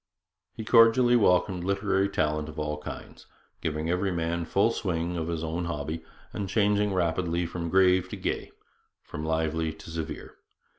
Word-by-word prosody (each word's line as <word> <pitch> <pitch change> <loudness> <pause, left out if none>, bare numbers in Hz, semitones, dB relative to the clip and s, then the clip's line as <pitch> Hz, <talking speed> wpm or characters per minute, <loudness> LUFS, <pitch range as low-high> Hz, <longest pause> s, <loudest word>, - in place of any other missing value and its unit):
He 110 - -6
cordially 120 +2 +6
welcomed 90 -4 +3
literary 100 0 +1
talent 75 -3 -1
of 75 - -11
all 75 0 -2
kinds, - - -9 0.3
giving 75 0 -2
every 90 +3 0
man 85 0 -1
full 100 +7 +2
swing 90 -5 -2
on 80 -1 -2
his 85 -1 -3
own 80 +2 -2
hobby, 80 0 -4 0.3
and 100 -2 -4
changing 105 0 +2
rapidly 85 -1 0
from 85 0 -4
grave 95 0 +4
to - - -5
gay, - - -3 0.5
from 75 - -7
lively 80 0 0
to 80 +1 -12
severe. 80 -1 -6
85 Hz, 155 wpm, -27 LUFS, 80-95 Hz, 0.5 s, cordially